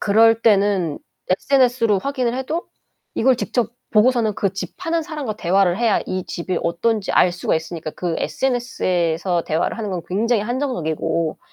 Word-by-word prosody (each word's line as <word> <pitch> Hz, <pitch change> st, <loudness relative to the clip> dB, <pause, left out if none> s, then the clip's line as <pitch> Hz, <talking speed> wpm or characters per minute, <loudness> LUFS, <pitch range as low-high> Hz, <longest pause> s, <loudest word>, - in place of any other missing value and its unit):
그럴 225 Hz, +2 st, +4 dB
때는 200 Hz, -7 st, +2 dB, 0.3 s
SNS로 245 Hz, -1 st, +3 dB
확인을 255 Hz, -2 st, -1 dB
해도 305 Hz, +6 st, -3 dB, 0.5 s
이걸 255 Hz, +2 st, +3 dB
직접 240 Hz, -1 st, -1 dB, 0.2 s
보고서는 225 Hz, -1 st, +3 dB
그 195 Hz, -2 st, -1 dB
집 200 Hz, -, -6 dB
파는 335 Hz, -2 st, -1 dB
사람과 295 Hz, -9 st, -5 dB
대화를 190 Hz, 0 st, +2 dB
해야 230 Hz, -3 st, +2 dB
이 185 Hz, -1 st, -3 dB
집이 175 Hz, +1 st, -3 dB
어떤지 195 Hz, +5 st, 0 dB
알 180 Hz, -, +4 dB
수가 180 Hz, -, -1 dB
있으니까 160 Hz, -1 st, -5 dB
그 175 Hz, -2 st, -3 dB
SNS에서 180 Hz, -9 st, 0 dB
대화를 160 Hz, +8 st, -1 dB
하는 210 Hz, -3 st, -3 dB
건 180 Hz, -2 st, -3 dB
굉장히 215 Hz, +3 st, +1 dB
한정적이고 170 Hz, -, -2 dB
210 Hz, 345 characters per minute, -21 LUFS, 180-245 Hz, 0.5 s, 그럴